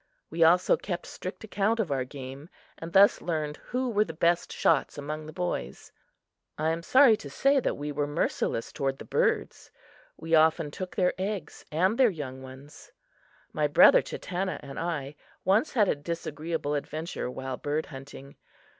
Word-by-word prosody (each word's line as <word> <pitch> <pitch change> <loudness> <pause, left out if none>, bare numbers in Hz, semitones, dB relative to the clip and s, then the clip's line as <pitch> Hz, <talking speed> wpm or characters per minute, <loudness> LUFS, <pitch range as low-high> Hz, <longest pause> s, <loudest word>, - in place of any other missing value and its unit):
We 165 +1 +2
also 175 +3 +5
kept 175 -3 -5
strict 185 +4 -7
account 220 +1 0
of 195 -9 -1
our 130 -2 0
game, 135 +3 -9 0.3
and 165 +1 -7
thus 195 +2 +6
learned 155 -3 -2
who 255 +1 -3
were 210 -3 +2
the 160 -6 -8
best 170 +1 +1
shots 155 -2 +1
among 150 +2 -5
the - - -7
boys. 180 +2 -4 0.7
I 155 +1 0
am 165 +1 -2
sorry 255 +5 +6
to 145 - -9
say 275 - +3
that - - -1
we 145 +1 -4
were 145 0 -1
merciless 145 -5 -1
toward 135 -1 -1
the - - -10
birds. - - -1 0.5
We 165 +1 -5
often 160 -1 +4
took 185 +4 -7
their 180 -2 +2
eggs 190 -4 -4
and 185 - +1
their 255 -3 +6
young 135 -7 -6
ones. 130 +3 -13 0.6
My 150 -1 +1
brother 160 +4 +7
Chatanna 185 +1 -4
and 135 - -7
I 150 -4 -3 0.3
once 205 +10 +2
had 210 -5 +3
a - - +3
disagreeable 155 0 -4
adventure 155 0 -4
while 130 0 -5
bird 150 +4 -2
hunting. 135 -1 -11
160 Hz, 170 wpm, -28 LUFS, 145-185 Hz, 0.7 s, brother